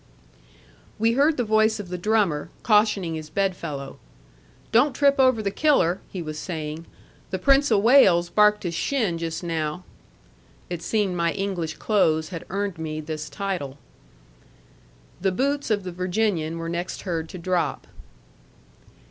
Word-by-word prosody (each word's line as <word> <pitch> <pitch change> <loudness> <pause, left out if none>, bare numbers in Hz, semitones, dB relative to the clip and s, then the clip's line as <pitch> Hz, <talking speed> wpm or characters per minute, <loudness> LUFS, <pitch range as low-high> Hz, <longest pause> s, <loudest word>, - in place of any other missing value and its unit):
We 225 +2 +2
heard 285 +6 +3
the 245 - +1
voice 220 0 +2
of 195 -3 -7
the 180 - -4
drummer, 200 -7 +1
cautioning 210 -6 +3
his 155 -1 -6
bed 195 +2 0
fellow. 140 -5 -7 0.7
"Don't 255 +5 +4
trip 280 -1 +3
over 255 -4 +4
the 200 - -1
Killer," 195 - +2
he 180 -3 -5
was 155 -1 -6
saying. 160 -2 -5 0.4
"The 190 - -2
Prince 275 +8 +4
of 205 -3 +3
Wales 195 -9 +6
barked 210 +2 +4
his 175 -2 -3
shin 200 -3 -1
just 165 +1 -4
now." 160 0 -3 0.9
It 175 -2 -4
seemed 200 0 0
my 170 -1 +1
English 190 -5 -3
clothes 160 -7 +1
had 175 -2 -7
earned 195 -2 -3
me 155 -1 -4
this 155 0 -5
title. 180 -9 -4 1.4
The 190 0 +2
boots 280 +8 -1
of 205 -3 +1
the 185 - -5
Virginian 180 -2 -1
were 165 0 -5
next 170 +2 -4
heard 165 -4 -3
to - - -8
drop. 180 0 -1
185 Hz, 150 wpm, -24 LUFS, 165-215 Hz, 1.4 s, Wales